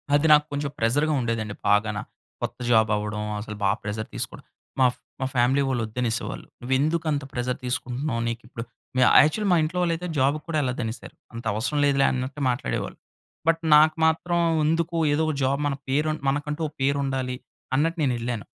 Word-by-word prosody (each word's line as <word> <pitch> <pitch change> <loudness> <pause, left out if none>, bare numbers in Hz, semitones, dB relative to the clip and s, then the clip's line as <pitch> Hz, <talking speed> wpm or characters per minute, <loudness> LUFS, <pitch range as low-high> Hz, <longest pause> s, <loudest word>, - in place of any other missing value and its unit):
అది 145 +2 +2
నాకు 150 0 +5
కొంచెం 145 0 -2
ప్రెసర్‌గా 145 +7 +2
ఉండేదండి 115 -3 -2
బాగాన. 105 +1 +2 0.4
కొత్త - - -3
జాబ్ 110 -1 +5
అవ్వడం! 105 0 -3 0.2
అసలు 105 0 -6
బాగా 100 +2 +2
ప్రెసర్ 105 +1 -4
తీసుకోవడం. - - -5 0.4
మా, 130 - +6 0.3
మా 130 - -1
ఫ్యామిలీ 125 +3 +3
వోళ్ళు 130 -3 0
వద్దు 110 +3 -7
అనేసేవాళ్ళు, 120 -1 -2 0.2
"నువ్వు 125 +2 -1
ఎందుకు 160 +3 0
అంత 145 -1 -1
ప్రెసర్ 125 0 -2
తీసుకుంటున్నావ్! 125 +1 -2
నీకు 115 0 -3
ఇప్పుడు" 115 -1 -6 0.3
మ్యా-యాక్చువల్‌ల్లి 155 - +5
మా - - +5
ఇంట్లో 160 +4 -3
వోళ్ళు 170 -1 +2
అయితే, 180 +2 -5
జాబ్‌కి 140 +3 +2
కూడా 165 -2 -1
ఎళ్ళదు 130 -2 -2
అనేసారు. 110 +2 -7 0.2
అంత 115 +1 -8
అవసరం 130 +8 -1
లేదులే 140 -1 +3
అన్నట్టు 130 +3 -4
మాట్లాడేవాళ్ళు. 125 0 -2 0.5
బట్, 165 0 +3
నాకు 155 +1 +6
మాత్రం 170 +2 +1 0.3
ఎందుకు, 165 +2 0 0.2
ఏదో 150 - +1
ఒక 155 - 0
జాబ్ 135 +2 +1
మన 140 - -1
పేరు 150 +3 +1 0.2
మనకంటూ 150 +3 -2
ఒక 150 - -12
పేరు 140 +1 +2
ఉండాలి, 130 -2 -2 0.4
అన్నట్టు 165 +5 +1
నేను 130 -3 +2
ఎళ్ళాను. 115 -3 -3
135 Hz, 180 wpm, -25 LUFS, 115-150 Hz, 0.5 s, మా